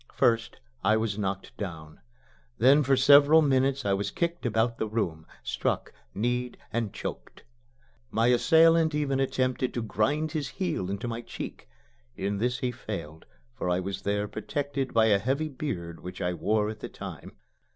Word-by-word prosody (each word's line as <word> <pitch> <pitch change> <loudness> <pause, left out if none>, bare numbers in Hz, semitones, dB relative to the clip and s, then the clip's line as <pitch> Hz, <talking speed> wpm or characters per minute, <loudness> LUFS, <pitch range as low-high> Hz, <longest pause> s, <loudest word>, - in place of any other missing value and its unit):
First 115 0 +1 0.2
I 110 +3 +4
was 110 -2 -1
knocked 95 -1 -3
down. 80 -6 -7 0.6
Then 135 +5 +6
for 135 -1 +3
several 145 +4 +7
minutes 135 -1 +2
I 100 - +2
was 100 +1 -1
kicked 170 +8 -2
about 115 +1 0
the 110 - 0
room 85 -8 -2 0.2
struck, - - -2 0.2
kneed 125 +3 -1 0.2
and 115 -3 -1
choked. - - -7 0.7
My 115 -1 +1
assailant 160 +5 +5
even 140 -3 0
attempted 130 -1 0
to 120 - -1
grind 145 +9 0
his 155 -3 -2
heel 160 - -1
into 100 +4 -3
my 115 0 -4
cheek. - - -8 0.5
In 100 +5 -2
this 125 +2 0
he 125 - 0
failed, 85 -10 -7 0.3
for 90 - -3
I 90 0 +2
was 95 +1 -4
there 105 +1 -1
protected 140 +2 -3
by 110 -1 +4
a 105 -3 +4
heavy 140 +8 -1
beard 95 - -5
which 90 0 -8
I 90 0 -1
wore 105 +5 +1
at 110 - -10
that - - -8
time. - - -8
115 Hz, 165 wpm, -28 LUFS, 100-135 Hz, 0.7 s, several